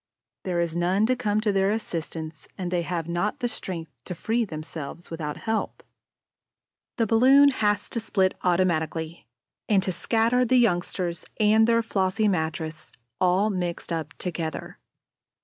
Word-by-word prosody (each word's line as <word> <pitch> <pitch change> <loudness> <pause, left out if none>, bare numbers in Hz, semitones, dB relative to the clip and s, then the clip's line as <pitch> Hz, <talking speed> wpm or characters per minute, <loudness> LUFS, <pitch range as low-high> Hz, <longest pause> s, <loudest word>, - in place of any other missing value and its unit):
There 180 -2 0
is 170 -1 -1
none 180 +5 +2
to 255 +3 +2
come 215 -4 0
to 215 -2 +1
their 195 0 +2
assistance; 165 - -4
and 180 -2 -3
they 175 -1 +1
have 170 -1 -3
not 175 +5 -1
the 245 - 0
strength 170 -8 -5
to 180 - -5
free 230 +6 0
themselves 155 -1 -7
without 155 -3 -4
help. 225 0 -3 1.1
The 230 - +2
balloon 260 +6 +6
has 210 -6 +1
to 235 - -1
split 190 -4 +1
automatically 170 -2 0 0.4
and 200 -3 +4
to 190 - 0
scatter 230 +6 +2
the 255 +1 +3
youngsters 175 -5 +1 0.2
and 220 +1 +5
their 230 0 +3
flossy 195 0 +1
mattress 160 -3 -2 0.3
all 185 +4 +3
mixed 175 -2 -3
up 160 -1 -4
together. 165 -3 -5
185 Hz, 150 wpm, -26 LUFS, 170-220 Hz, 1.1 s, balloon